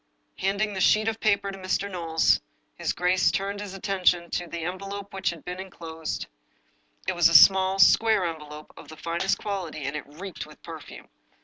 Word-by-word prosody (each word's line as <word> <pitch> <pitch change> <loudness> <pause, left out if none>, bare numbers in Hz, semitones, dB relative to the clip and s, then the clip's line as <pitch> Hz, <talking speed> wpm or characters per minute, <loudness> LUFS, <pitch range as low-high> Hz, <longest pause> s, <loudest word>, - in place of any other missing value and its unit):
Handing 200 +2 0
the 190 - -3
sheet 215 +4 +4
of 225 0 -1
paper 200 -2 +1
to 195 - -9
Mr. 185 +1 -1
Knowles, 165 -4 +1 0.3
his - - -2
g^ace 180 +1 +2
turned 200 +1 -2
his 200 -2 -7
attention 185 -3 +1
to 175 - -2
the 170 -1 -5
envelope 195 +3 -6
which 195 - -1
had 170 -3 -8
been 180 +1 -5
in 190 0 -7
closed. 160 -2 -6 0.8
It - - +1
was 175 -1 +5
a 170 - 0
small, 190 +3 +7
square 215 +1 +5
envelope, 150 -2 -7
of - - -13
the 160 +1 -11
finest 170 +4 -1
qual 200 -4 -3
ity, 155 -3 -7
and 140 +2 -3
it 150 - -6
reeked 175 +5 -8
with - - -16
perfume. - - -10
185 Hz, 195 wpm, -26 LUFS, 165-195 Hz, 0.8 s, small